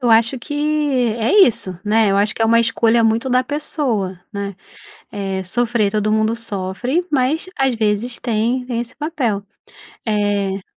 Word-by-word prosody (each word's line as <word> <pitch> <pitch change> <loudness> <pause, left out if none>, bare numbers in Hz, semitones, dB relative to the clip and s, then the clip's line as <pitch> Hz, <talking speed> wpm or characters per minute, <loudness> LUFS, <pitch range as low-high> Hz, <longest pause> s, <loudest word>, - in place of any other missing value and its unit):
Eu 245 -2 +1
acho 230 +3 +4
que 290 - -8 0.7
é 225 +1 +1
isso, 200 -5 -2
né, 215 0 +3
eu 195 - +2
acho 205 +1 +2
que 225 - -2
é - - +5
uma 230 +1 +4
escolha 230 0 +2
muito 225 +3 +1
da 255 +1 +3
pessoa, 245 - -2
né, 200 -1 -4 0.6
eh, 195 -2 -3
sofrer 225 +2 0
todo 215 0 0
mundo 220 +1 +1
sofre, 225 - -2
mas, 290 +5 0
às 270 -3 +2
vezes, 220 +2 -1
tem 240 +2 0
tem 240 -2 -2
esse 240 0 -7
papel, 270 -10 -2 0.6
eh 205 -3 0
225 Hz, 160 wpm, -19 LUFS, 205-245 Hz, 0.7 s, é